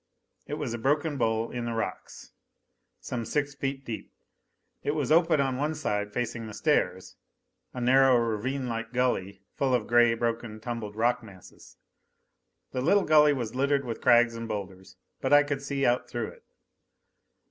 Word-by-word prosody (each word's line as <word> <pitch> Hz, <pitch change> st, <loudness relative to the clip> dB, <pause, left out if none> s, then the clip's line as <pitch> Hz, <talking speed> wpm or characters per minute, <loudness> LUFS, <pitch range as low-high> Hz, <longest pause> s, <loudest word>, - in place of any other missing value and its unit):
It 150 Hz, -, -3 dB
was 145 Hz, -6 st, -4 dB
a 120 Hz, -, -4 dB
broken 145 Hz, +5 st, +1 dB
bowl 115 Hz, -1 st, 0 dB
in 120 Hz, -1 st, -4 dB
the 120 Hz, -, -2 dB
rocks, 115 Hz, -, -5 dB, 0.7 s
some 120 Hz, -2 st, -4 dB
six 145 Hz, +4 st, -1 dB
feet 135 Hz, 0 st, -4 dB
deep. 115 Hz, -, -6 dB, 0.7 s
It 145 Hz, -, -1 dB
was 150 Hz, -2 st, -1 dB
open 165 Hz, -1 st, +4 dB
on 135 Hz, +2 st, 0 dB
the 160 Hz, -, -4 dB
side 105 Hz, -9 st, -2 dB
facing 115 Hz, 0 st, -3 dB
the 105 Hz, -, -8 dB
stairs 95 Hz, -, 0 dB, 0.5 s
a 125 Hz, -, -7 dB
narrow, 130 Hz, +1 st, +5 dB
ravinelike 115 Hz, +1 st, -2 dB
gully, 100 Hz, -6 st, -1 dB
full 130 Hz, -2 st, +1 dB
of 115 Hz, -4 st, -1 dB
gray, 120 Hz, -1 st, +4 dB
broken, 115 Hz, -1 st, -3 dB
tumbled 110 Hz, -3 st, -5 dB
rock 120 Hz, +2 st, +1 dB
masses. 95 Hz, -6 st, -15 dB, 0.9 s
The 125 Hz, -, -2 dB
little 195 Hz, +8 st, +3 dB
gully 150 Hz, -1 st, +6 dB
was 120 Hz, -5 st, -4 dB
littered 140 Hz, +1 st, +1 dB
with 115 Hz, -2 st, -5 dB
crags 120 Hz, -1 st, +5 dB
and 115 Hz, 0 st, -5 dB
boulders. 95 Hz, -3 st, -6 dB, 0.3 s
But 135 Hz, +1 st, +1 dB
I 145 Hz, 0 st, +8 dB
could 145 Hz, -1 st, -3 dB
see 140 Hz, -1 st, -1 dB
out 120 Hz, +1 st, +1 dB
through 120 Hz, -3 st, -3 dB
it. -, -, -16 dB
120 Hz, 165 wpm, -28 LUFS, 115-140 Hz, 0.9 s, I